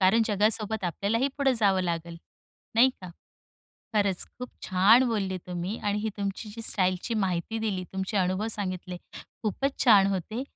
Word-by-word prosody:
कारण 195 +5 +5
जगासोबत 215 0 +1
आपल्यालाही 205 - 0
पुढं 275 -2 +3
जावं 195 -2 +3
लागेल. 170 -1 -3 0.6
नाही 250 +3 +6
का? 185 - -8 0.9
खरंच 200 -3 +2
खूप 250 0 -6 0.2
छान 200 +7 +6
बोलले 195 -5 -1
तुम्ही 180 +4 -3
आणि 205 0 -1
ही 220 - -1
तुमची 200 +2 -4
जी 225 +2 -8
स्टाईलची 185 +4 0
माहिती 195 +1 -1
दिली, 205 -4 -2
तुमचे 190 +2 -3
अनुभव 185 +2 +1
सांगितले 185 -3 -3 0.5
खूपच 270 +6 -1
छान 205 -6 +7
होते. 215 +7 -3
200 Hz, 150 wpm, -27 LUFS, 185-220 Hz, 0.9 s, छान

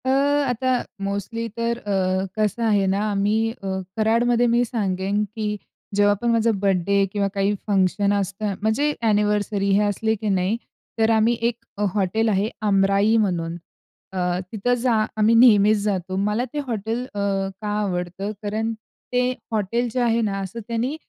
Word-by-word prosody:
अ, - - +1
आता 275 -2 +1 0.4
मोस्टली 200 +4 -3
तर 235 0 0
अ, 190 -3 0
कसं 215 +2 0
आहे 205 -3 +3
ना, 200 - 0
आम्ही 205 +2 +1 0.2
अ, - - -4 0.3
कराडमध्ये 235 +2 +3
मी 240 +1 +4
सांगेन 200 -3 -1
की 215 -1 -2 0.5
जेव्हा 205 0 +4
पण 240 - -1
माझा 230 0 +3
बर्थडे 195 +1 +2
किंवा 200 -1 0
काही 200 0 +1
फंक्शन 200 0 +2
असतं. 200 +1 -2
म्हणजे 240 +8 +1
ॲनिव्हर्सरी 205 -1 +1
हे 210 - +3
असले 220 +2 0
की 215 0 -3
नाही, 185 +5 0 0.4
तर 220 0 +3
आम्ही 225 +1 +3
एक 240 - -6 0.2
अ, 205 - -1
हॉटेल 215 +3 +1
आहे 205 +1 +1 0.2
अमराई 195 +2 +3
म्हणून 170 -3 -2 0.6
अ, 180 -1 0
तिथं 225 +3 0
जा 250 -2 +3 0.2
आम्ही 215 +1 +4
नेहमीच 215 -3 +6
जातो. 185 -3 -2
मला 210 +4 0
ते 295 - -2
हॉटेल 225 +1 -2
अ, 205 - -4 0.4
का 210 - -4
आवडतं? 185 +1 -3
कारण 220 +2 -1 0.4
ते 250 0 +2 0.2
हॉटेल 225 +3 0
जे 255 - 0
आहे 235 -1 +2
ना 200 -3 -1
असं 195 +4 -5
त्यांनी 240 +5 -1
210 Hz, 160 wpm, -23 LUFS, 195-230 Hz, 0.6 s, नेहमीच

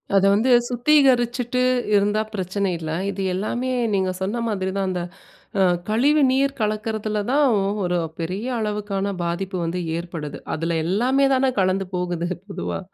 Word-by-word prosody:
அதை 195 0 +5
வந்து 235 +5 +2 0.2
சுத்திகரிச்சுட்டு 250 -2 +2 0.3
இருந்தா 205 +2 +2
பிரச்சனை 190 0 -1
இல்ல. 160 -1 -5 0.2
இது 195 0 -4
எல்லாமே 240 +7 -2 0.2
நீங்க 190 -1 +1
சொன்ன 220 +5 -1
மாதிரி 190 -3 -1
தான், 195 -1 0
அந்த 180 -1 -2 0.6
அ - - +5 0.3
கழிவு 285 +7 +3
நீர் 275 +1 +1
கலக்கிறதுல 215 0 -1
தான் 290 +1 +4 0.2
ஒ - - 0 0.2
1 175 0 0 0.2
பெரிய 185 +8 -3
அளவுக்கான 205 -2 -2
பாதிப்பு 185 +3 -3
வந்து 175 +2 -2 0.2
ஏற்படுது. 165 -4 -6 0.2
அதல 165 +1 -1
எல்லாமே 255 +9 +2
தான 260 0 +2
கலந்து 190 0 +1
போகுது, 175 -1 -2 0.2
பொதுவா 195 - -4
205 Hz, 145 wpm, -22 LUFS, 185-245 Hz, 0.6 s, அதை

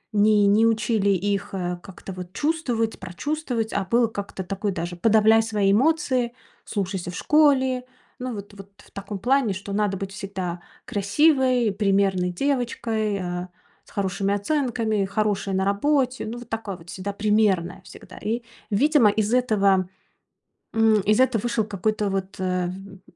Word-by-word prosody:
не 210 0 +5
не 210 +3 +4
учили 220 -2 +1
их 200 +1 0
как-то 180 +1 -5
вот 180 0 -8
чувствовать, 255 -8 -1
прочувствовать, 230 - -3
а 200 - 0
было 235 +5 +3
как-то 200 -3 -6
такое 195 +2 -2
даже: 175 -1 -4
подавляй 220 +3 +5
свои 210 -3 +1
эмоции, 255 -1 +2 0.3
слушайся 190 -3 -3
в - - -9
школе. 265 -4 +3 0.3
Ну 250 -1 -4
вот 200 0 -9
вот 195 0 -12 0.2
в - - -22
таком 200 0 -6
плане, 245 -1 +2
что 200 +1 -6
надо 205 -2 0
быть 195 0 -5
всегда 190 -3 -5 0.2
красивой, 250 +2 +2
примерной 195 -2 +1
девочкой, 225 -2 -1
э, 180 -1 -4 0.4
с - - -20
хорошими 195 0 -1
оценками, 225 -3 0
хорошая 200 -1 -1
на 190 0 +1
работе. 255 +4 +1
Ну, 235 +2 -5
вот 240 -1 -10
такое 220 -5 -4
вот 165 +1 -16
всегда 195 +2 -4
примерная, 200 -4 +1
всегда. - - -13
И, 230 +3 -2 0.3
видимо, 255 +1 +4
из 215 +2 0
этого 200 -7 +3 0.8
м, 225 -1 +4
из 215 +5 +3
это 255 -3 +3
вышел 235 0 0
какой-то 210 +1 -1
вот, 195 0 -3
э, 185 -1 0
в - - -3
н 195 0 -10
205 Hz, 155 wpm, -24 LUFS, 195-235 Hz, 0.8 s, не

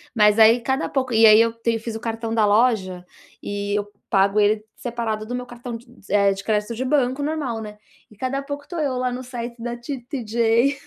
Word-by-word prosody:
mas 210 -1 +4
aí 225 +2 +7
cada 265 +2 -1
pouco 260 -3 -2
e 225 0 +6
aí 215 0 +8
eu 230 0 +2
tenho 230 -1 -2
fiz 225 -1 -5
o 225 - -4
cartão 225 0 -4
da 220 -2 +3
loja, 205 -5 +2 0.4
e 205 0 -3
eu 205 0 -4 0.2
pago 195 +1 +3
ele 210 +1 +2
separado 230 -3 -3
do 245 +3 -4
meu 250 0 -4
cartão 240 0 -8
d 230 +1 -10 0.2
eh, 200 -1 +4
de 195 +1 -5
crédito 215 +1 0
de 255 +3 -3
banco 265 -1 +1
normal, 285 -7 -2
né, 210 -1 -9 0.3
e 215 - -18
cada 260 +5 -2
pouco 285 +1 -6
tô 350 - -5
eu 280 -4 0
lá 250 0 -1
no 250 - -5
site 240 -2 -7
da 240 0 -3
T 245 +3 -6
TJ 235 +1 +1
230 Hz, 220 wpm, -22 LUFS, 215-250 Hz, 0.4 s, aí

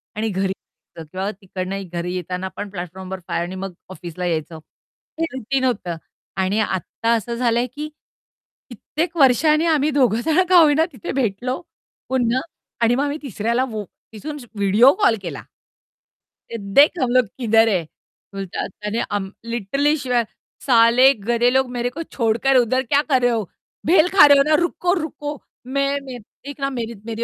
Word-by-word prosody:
आणि 220 +1 -1
घरी 190 0 -1
यायचं 165 -3 -16
किंवा 190 +2 -3
तिकडनं 195 +1 -5
घरी 175 +1 -3
येताना 180 +1 -4
पण 205 - -5
प्लॅटफॉर्म 185 -1 -7
नंबर 190 0 -6
5 170 - -1
आणि 185 - -7
मग 190 -1 -5 0.2
ऑफिसला 175 0 -6
यायचं. 160 -1 -2 0.6
हे 330 - +2
रूटीन 260 +1 -2
होतं. 205 -9 -1 0.4
आणि 190 +3 +1
आत्ता 215 +3 -1
असं 235 +2 -3
झालं 235 -1 +1
आहे, 250 - 0
की 295 +5 -6 0.8
कित्येक 315 - -4
वर्षांनी 305 +4 +4
आम्ही 305 -2 +2
दोघं 245 -5 +2
जण 325 +3 +3
का 365 - +7
होईना 315 0 +5
तिथे 235 - -6
भेटलो, 250 0 -2 0.5
पुन्हा 255 -1 +1 0.4
आणि 235 +1 +4
मग 275 - +1
आम्ही 290 +1 -2
तिसऱ्याला 235 -1 -1
वो 215 -2 -4 0.3
तिथून 295 +8 -6 0.2
व्हिडिओ 210 +7 +5
कॉल 230 - +5
केला. 175 - -6 1.2
देख 280 - +4
हम 250 - +1
लोग 255 0 +4
किधर 225 -2 +4
है? 185 -6 +1 0.5
बोलतात 195 -2 -4
त्याने 210 +2 -2
आम 200 -2 -2
लिटरली 240 +6 0
शिव्या 250 -4 0 0.4
साले 245 +1 +6 0.2
गधे 240 +1 +3
लोग 265 -1 +2
मेरे 245 0 -1
को 290 +7 -7 0.2
छोडकर 235 +3 +2
उधर 255 +2 +2
क्या 285 0 +4
कर 260 -2 +3
रहे 245 0 +3
हो? 225 -2 0 0.4
बेल 340 +1 +5
खा 370 -7 +8
रहे 285 -1 +7
हो 275 - +5
ना, 305 +1 +3
रुको, 350 +1 0
रुको 295 -1 -5 0.3
मैं 275 +2 0 0.5
देख 285 0 -8
ना 275 - 0
मेरे 235 -3 -4
मेरे 230 0 -3
240 Hz, 165 wpm, -21 LUFS, 200-275 Hz, 1.2 s, खा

